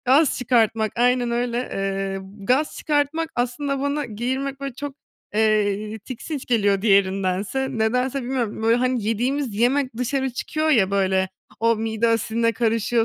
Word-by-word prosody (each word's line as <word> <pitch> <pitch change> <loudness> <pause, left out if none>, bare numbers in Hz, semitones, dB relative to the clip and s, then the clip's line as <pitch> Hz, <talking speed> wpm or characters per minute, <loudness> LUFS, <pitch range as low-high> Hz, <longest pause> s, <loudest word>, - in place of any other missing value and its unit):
gaz 275 +3 +4
çıkartmak, 225 -3 +2
aynen 245 0 +2
öyle. 240 0 -1
Eee, 195 -4 -2 0.3
gaz 275 +5 +2
çıkartmak, 305 +2 0
aslında 265 +3 -1
bana 285 +1 -1
geğirmek 260 +5 -3
böyle 275 -2 -5
çok, 285 +1 -6 0.4
eee, 215 0 +1
tiksinç 255 +6 -6
geliyor 205 -5 +2
diğerindense. 195 +4 +1
Nedense 250 +4 +1
bilmiyorum, 240 -4 -2
böyle, 230 +1 +4
hani, 250 -1 0
yediğimiz 245 +2 -1
yemek 250 +2 +1
dışarı 265 +2 -1
çıkıyor 310 +5 -1
ya 200 -9 +4
böyle, 190 -1 +1 0.3
o 230 0 +3
mide 225 +1 0
asidine 230 +1 +1
karışıyor, 230 0 +1
235 Hz, 140 wpm, -23 LUFS, 215-265 Hz, 0.4 s, gaz